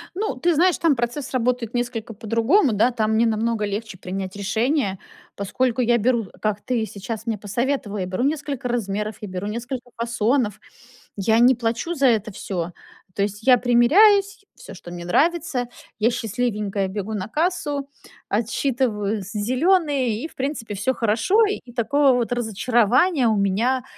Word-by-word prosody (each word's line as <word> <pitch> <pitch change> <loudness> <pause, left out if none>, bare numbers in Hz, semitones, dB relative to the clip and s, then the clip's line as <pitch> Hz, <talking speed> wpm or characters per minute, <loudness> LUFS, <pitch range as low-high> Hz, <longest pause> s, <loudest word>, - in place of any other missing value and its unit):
Ну, 395 -9 -2
ты 340 +7 +1
знаешь, 360 +3 +3
там 325 -4 +3
процесс 240 +3 -3
работает 245 -2 -1
несколько 240 -2 -3
по-другому, 230 - +2
да. 230 +5 +3
Там 220 -2 0
мне 225 +2 +3
намного 225 -1 0
легче 205 -1 -5
принять 190 +1 -5
решение, 220 - 0 0.4
поскольку 245 +5 -1
я 240 0 +3
беру, 235 -1 +1
как 215 -1 -1
ты 235 -3 -1
сейчас 220 +2 -6
мне 225 -3 -1
посоветовал, 210 +1 -2
я 185 - -2
беру 185 +7 -2
несколько 285 -3 -2
размеров, 210 -2 -2
я 210 - -5
беру 185 +2 -4
несколько 245 +3 -5
фасонов, 235 -1 0 0.6
я 220 +3 +2
не 250 +1 +6
плачу 235 +8 -2
за 275 -4 +3
это 220 -3 +1
всё. 175 -3 -4 0.4
То - - -1
есть 205 +1 -4
я 255 -1 +6
примеряюсь, 390 - +4
всё, - - -11
что 175 - -11
мне 175 -1 -7
нравится, 290 - +1 0.3
я 225 - +3
счастливенькая 210 -4 -2
бегу 205 +2 -4
на 195 -2 -3
кассу, 295 -1 -1 0.4
отсчитываю 220 -2 -1
з 190 - -9
зеленые, 260 - +1
и - - -3
в - - -22
принципе, 265 -6 -4
всё 215 +7 0
хорошо. 240 - +2
И 255 -12 -5
такого, 275 +3 +3
вот, 245 -1 0
разочарования, 240 - +2
у 220 - +3
меня, 225 +7 +1
235 Hz, 160 wpm, -22 LUFS, 210-265 Hz, 0.6 s, не